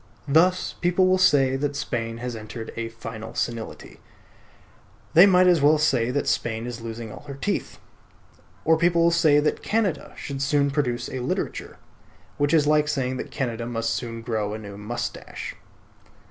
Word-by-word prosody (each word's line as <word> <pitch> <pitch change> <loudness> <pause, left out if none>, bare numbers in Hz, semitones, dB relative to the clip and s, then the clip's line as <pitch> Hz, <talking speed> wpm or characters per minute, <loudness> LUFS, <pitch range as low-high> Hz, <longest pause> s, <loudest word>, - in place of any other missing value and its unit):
Thus 175 +6 +3
people 180 +1 +3
will 185 0 +3
say 135 -7 +4
that 145 +1 -2
Spain 115 -4 -3
has 125 0 -5
entered 110 +1 -8
a 115 0 -3
final 115 0 -8
senility; 115 -2 -4 1.1
they 175 +5 +9
might 185 -1 +5
as 175 -4 +4
well 150 +2 +5
say 135 -6 +2
that 140 +3 -1
Spain 115 0 -1
is 120 -1 -6
losing 115 -1 -6
all - - -10
her 140 - -6
teeth. 200 +9 -3 0.9
Or 160 0 +4
people 170 0 +3
will 170 - +4
say 160 -4 +4
that 150 +1 0
Canada 210 -7 -1
should 140 -2 -5
soon 140 0 +2
produce 125 -4 -1
a 130 - -5
literature; 125 - -3 0.6
which 145 0 +1
is 160 -3 +4
like 150 0 +3
saying 130 -3 -1
that - - -5
Canada 120 -3 -3
must 115 -1 -2
soon 115 -2 -4
grow 110 -2 -2
a - - -4
new 100 -2 -9
moustache. 105 +4 -5
135 Hz, 170 wpm, -24 LUFS, 115-155 Hz, 1.1 s, they